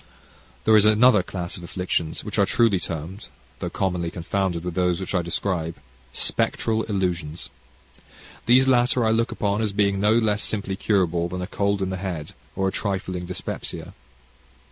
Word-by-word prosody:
There 110 - +5
is 105 -1 +6
another 110 0 +6
class 90 -1 -5
of 90 - -10
affections 85 -2 -2
which - - -3
are - - +5
truly 110 -5 +3
termed 85 +5 -6 0.3
though - - -3
commonly 90 -3 -1
confounded 90 0 -2
with 90 -1 -3
those 90 -1 +1
which 95 - -5
I 90 - +2
describe 85 -1 -1 0.4
spectral 110 - +1
illusions. 90 -6 -2 1.0
These 130 +2 +6
latter 125 -1 +3
I 110 - +3
look 115 +1 +1
upon 100 0 0
as 105 -2 -1
being 100 -1 +2
no 105 +2 +4
less 105 -3 +2
simply 100 -2 -2
curable 90 -4 +1
than 90 +1 -4
a - - -2
cold 100 0 0
in 95 - -2
the 95 - -2
head 90 -5 -5 0.2
or 95 0 0
a - - 0
trifling 95 -3 -3
dyspepsia. 90 - -5
95 Hz, 165 wpm, -24 LUFS, 90-105 Hz, 1.0 s, is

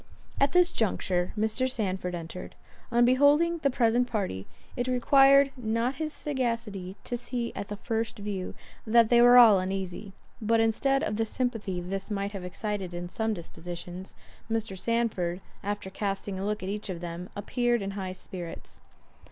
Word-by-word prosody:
At 275 0 +3
this 360 -1 +5
juncture 185 -4 0
Mr. 220 +5 +1
Sandford 190 -7 -2
entered. 170 +1 -7 0.4
On 240 0 +5
beholding 290 +7 +4
the 285 -3 +2
present 245 -1 +2
party, 195 - -3 0.3
it 245 0 -2
required 270 +2 +5
not 240 +2 -1
his 310 0 -2
sagacity 230 -10 -3
to 245 - -3
see 240 -1 -3
at 200 - -4
the 205 - -5
first 225 +1 -3
view, 200 -3 -4 0.3
that 230 0 +5
they 240 -1 +6
were 245 +1 +8
all 220 -5 +9
uneasy; 190 +1 -4 0.3
but 225 +1 +2
instead 270 +5 +2
of 210 - -1
the 225 - +1
sympathy 225 -6 -2
this 195 +3 -4
might 200 -1 -2
have 195 -3 -6
excited 190 -1 -4
in 175 0 -5
some 220 +3 -1
dispositions, 175 +1 -8 0.3
Mr. 225 -3 -1
Sandford, 195 -5 -1 0.2
after 205 -1 -4
casting 195 -1 -3
a 195 - -3
look 210 -1 -2
at 190 - -3
each 210 +1 -4
of 175 -2 -4
them, 175 +1 -6
appeared 240 +2 0
in 195 - -3
high 190 -2 -4
spirits. 180 -2 -7
215 Hz, 165 wpm, -28 LUFS, 190-240 Hz, 0.4 s, all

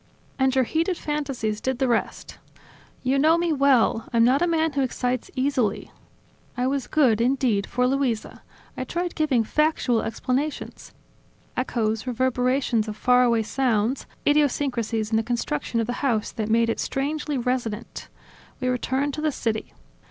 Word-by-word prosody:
"And 265 0 +2
your 260 - +4
heated 330 +7 0
fantasies 275 -8 -3
did 260 -1 -1
the 265 0 +1
rest." 235 -2 -2 0.6
"You 265 +2 +2
know 315 +4 +5
me 340 -1 +1
well; 265 -5 +3
I'm 230 -1 +4
not 255 +5 +4
a 350 - +3
man 320 -1 +1
who 280 - 0
excites 250 -1 -2
easily. 255 -6 0 0.7
I 250 - 0
was 270 0 -1
good, 250 -8 +3
indeed, 240 -5 +1
for 250 +1 0
Luisa; 255 -4 -1 0.3
I - - -3
tried 350 0 -3
giving 285 -7 +1
factual 280 -2 +1
explanations: 255 +6 -3 0.6
echoes, 225 -2 -1
reverberations 250 -2 +1
of 215 0 -5
far 250 +2 +4
away 235 -2 +3
sounds; 240 0 0 0.2
idiosyncrasies 250 -7 +1
in 220 - +3
the - - +3
construction 230 -3 -2
of 225 - +1
the 245 - -3
house 235 -7 0
that 215 -1 -4
made 230 +1 +3
it - - -4
strangely 290 +1 -2
resonant... 240 -3 -3 0.5
We 255 -1 -1
returned 265 +3 -1
to 305 - -4
the 310 -1 +1
city. 225 -5 -3
255 Hz, 155 wpm, -24 LUFS, 230-280 Hz, 0.7 s, know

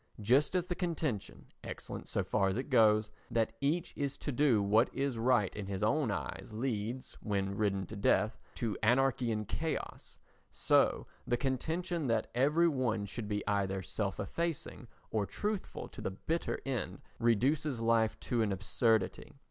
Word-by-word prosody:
Just 130 - +3
as 180 -1 +2
the 180 - -2
contention, 160 - -3 0.2
excellent - - -7
so - - 0
far 100 - +1
as 95 +2 0
it 135 +3 -4
goes, 110 -3 +5 0.2
that 115 -1 +1
each 165 +5 0
is 140 -1 -2
to 145 - -3
do 135 -4 +4
what 110 +5 +4
is 135 -1 0
right 115 -5 +2
in 105 -2 -5
his 100 0 -3
own 130 +4 +2
eyes 100 - -4
leads, 115 +1 -3
when 100 -2 -1
ridden 100 -2 0
to 110 - -8
death, 105 +1 +2 0.2
to 115 -4 -2
anarchy 125 +1 +3
and 105 -2 -2
chaos, 160 +7 -4 0.3
so - - +3 0.2
the 120 - +2
contention 160 +5 -1
that 115 -2 0
every 150 +7 +4
one 120 -8 0
should 100 +2 -5
be 105 -1 -2
either 95 -2 0
self 100 +2 -2
effacing 150 - -3 0.2
or 105 -3 0
truthful 210 -1 -3
to - - -10
the - - -1
bitter 160 - -2
end 120 -9 -2 0.2
reduces 125 +4 +2
life 115 -1 +2
to 120 -2 0
an 105 -2 +1
absurdity. 105 +3 +1
115 Hz, 165 wpm, -33 LUFS, 105-140 Hz, 0.3 s, goes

